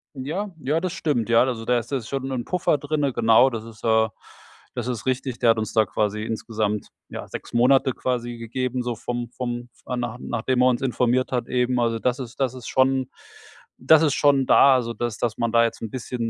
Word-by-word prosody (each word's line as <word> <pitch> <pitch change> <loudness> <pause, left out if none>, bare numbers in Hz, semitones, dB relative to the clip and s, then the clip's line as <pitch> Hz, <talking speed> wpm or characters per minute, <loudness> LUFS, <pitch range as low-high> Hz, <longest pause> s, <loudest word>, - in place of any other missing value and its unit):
Ja, 160 +10 -4
ja, 150 +3 0
das 180 0 -3
stimmt, 130 -8 -1
ja. 115 +1 +5
Also, 120 -3 -3
da 125 0 +2
ist 115 - -9
jetzt 130 -5 -2
schon 135 0 -3
'n 125 -2 -3
Puffer 180 -4 +1
drinnen. 145 -1 -1
Genau, 120 +3 +5
das 115 -3 -5
ist, 115 -2 -13
äh 110 -1 +3 0.7
das 120 -1 -3
ist 120 -3 -4
richtig. 130 -1 -2
Der 120 - +3
hat 115 - 0
uns 110 -1 -4
da 110 -1 +4
quasi 105 +2 -1
insgesamt, 110 -2 -2 0.2
ja, - - -7
6 - - -9
Monate 130 +3 +4
quasi 120 -1 -3
gegeben, 125 +2 -3
so 120 -1 -3
vom 120 +1 -4
vom 120 -1 -5
f - - -27
äh, - - -1
nach 120 0 -3
nachdem 125 +2 -1
er 125 - +5
uns 125 0 0
informiert 125 0 +1
hat 125 -2 -1
eben. 125 0 0
Also, 115 -1 +1
das 125 +2 0
ist 120 -3 -8
das 130 -2 0
ist 125 -3 -9
schon 130 0 +2 0.7
das 155 +4 +5
ist 150 -4 +2
schon 140 -2 +3
da, 135 +1 +6
also, 115 -2 -1
dass 120 -2 -3
dass 120 -3 -2
man 115 -1 0
da 115 0 +5
jetzt 115 - -2
'n 115 - -4
bisschen 120 -1 -4
125 Hz, 225 wpm, -23 LUFS, 115-130 Hz, 0.7 s, da